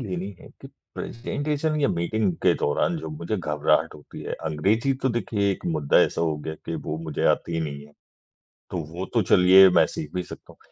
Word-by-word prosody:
लेनी 95 Hz, -3 st, -4 dB
है -, -, -13 dB
कि -, -, -10 dB, 0.3 s
प्रेज़ेंटेशन 150 Hz, +5 st, -2 dB
या 140 Hz, -, +3 dB
मीटिंग 95 Hz, +4 st, 0 dB
के -, -, +5 dB
दौरान 120 Hz, -, +1 dB
जो -, -, -6 dB
मुझे 150 Hz, -8 st, -4 dB
घबराहट 75 Hz, -4 st, +1 dB
होती 75 Hz, -, -11 dB
है -, -, -5 dB
अंग्रेज़ी 100 Hz, -, +1 dB
तो 130 Hz, -, +2 dB
देखिए 100 Hz, -4 st, 0 dB
एक 95 Hz, -, -5 dB
मुद्दा 75 Hz, -2 st, +3 dB
ऐसा -, -, +1 dB
हो 80 Hz, -2 st, 0 dB
गया 80 Hz, -, -3 dB
कि 85 Hz, -, -3 dB
वो 75 Hz, -, -2 dB
मुझे 80 Hz, -3 st, -4 dB
आती 85 Hz, -1 st, -5 dB
नहीं 70 Hz, -2 st, -5 dB
है। 75 Hz, -, -21 dB, 0.8 s
तो 90 Hz, -, -3 dB
वो 90 Hz, +2 st, -4 dB
तो 115 Hz, -, +4 dB
चलिए, 95 Hz, +1 st, +7 dB
मैं -, -, +5 dB
सीख 75 Hz, -, -7 dB
भी 90 Hz, -, -1 dB
सकता -, -, -12 dB
हूँ। -, -, -25 dB
90 Hz, 200 wpm, -24 LUFS, 80-110 Hz, 0.8 s, चलिए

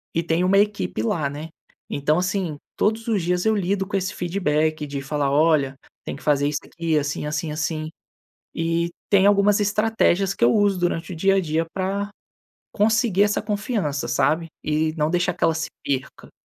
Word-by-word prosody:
e 165 Hz, -, +1 dB
tem 165 Hz, +1 st, +1 dB
uma 190 Hz, +2 st, +4 dB
equipe 205 Hz, -, 0 dB
lá, 140 Hz, +5 st, 0 dB
né. 150 Hz, +3 st, -7 dB, 0.4 s
Então, 150 Hz, +2 st, +1 dB
assim, 180 Hz, -4 st, -1 dB, 0.2 s
todos 220 Hz, +2 st, 0 dB
os 215 Hz, -4 st, +1 dB
dias 180 Hz, +2 st, 0 dB
eu 220 Hz, 0 st, +3 dB
lido 195 Hz, 0 st, 0 dB
com 200 Hz, -, -5 dB
esse 190 Hz, 0 st, -1 dB
feedback 155 Hz, -4 st, 0 dB
de 140 Hz, -1 st, -4 dB
falar: 145 Hz, 0 st, -1 dB
"Olha, 145 Hz, -2 st, +3 dB, 0.3 s
tem -, -, -5 dB
que 140 Hz, -, -13 dB
fazer 145 Hz, -1 st, +2 dB
isso 145 Hz, 0 st, -1 dB
aqui 165 Hz, -2 st, -1 dB
assim, 145 Hz, 0 st, -2 dB
assim, 155 Hz, +1 st, -2 dB
assim". 155 Hz, 0 st, -2 dB, 0.7 s
E 165 Hz, +1 st, 0 dB, 0.2 s
tem 200 Hz, -1 st, +5 dB
algumas 205 Hz, 0 st, +4 dB
estratégias 205 Hz, -2 st, +2 dB
que -, -, -2 dB
eu 120 Hz, -, +5 dB
uso 205 Hz, -3 st, +2 dB
durante 175 Hz, +1 st, -1 dB
o -, -, -7 dB
dia 195 Hz, +4 st, +3 dB
a -, -, +4 dB
dia 165 Hz, -1 st, -1 dB
pra 195 Hz, +2 st, -2 dB, 0.6 s
conseguir 215 Hz, -2 st, +3 dB
essa 205 Hz, 0 st, +1 dB
confiança, 200 Hz, -, -2 dB
sabe? 155 Hz, +7 st, +1 dB, 0.2 s
E 155 Hz, +1 st, 0 dB
não 150 Hz, -1 st, +1 dB
deixar 175 Hz, +1 st, +1 dB
que -, -, -5 dB
ela 165 Hz, -, +4 dB
se 160 Hz, -, -2 dB, 0.2 s
perca. 135 Hz, -2 st, -4 dB
170 Hz, 185 wpm, -23 LUFS, 150-200 Hz, 0.7 s, tem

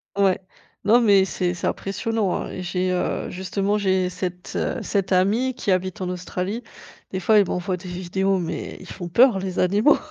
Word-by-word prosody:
Ouais, 195 Hz, -2 st, +3 dB, 0.4 s
non, 230 Hz, +4 st, +5 dB
mais 200 Hz, -4 st, +5 dB
c'est 180 Hz, -2 st, -1 dB
c'est 175 Hz, -, -3 dB
impressionnant, 205 Hz, 0 st, -1 dB
hein. -, -, -3 dB
Et 185 Hz, -, -5 dB
j'ai, 180 Hz, +1 st, -1 dB
heu, 180 Hz, -, -1 dB
justement, 195 Hz, +3 st, -1 dB
j'ai 190 Hz, -2 st, +1 dB
cette, 180 Hz, 0 st, -5 dB
heu, -, -, -1 dB
cette 195 Hz, -2 st, -1 dB
amie 210 Hz, +8 st, +2 dB
qui 225 Hz, -5 st, -2 dB
habite 185 Hz, 0 st, -1 dB
en 180 Hz, -, -2 dB
Australie. 180 Hz, +5 st, -4 dB, 0.5 s
Des 185 Hz, -, -2 dB
fois 215 Hz, +4 st, +4 dB
elle 200 Hz, -, +3 dB
m'envoie 180 Hz, +1 st, -2 dB
des 185 Hz, +1 st, -10 dB
vidéos, 190 Hz, +2 st, 0 dB
mais 170 Hz, -, -4 dB
ils -, -, -12 dB
font 175 Hz, -1 st, -6 dB
peur, 235 Hz, +4 st, +5 dB
les 185 Hz, -1 st, -3 dB
animaux. 205 Hz, +10 st, +4 dB
190 Hz, 190 wpm, -23 LUFS, 180-200 Hz, 0.5 s, non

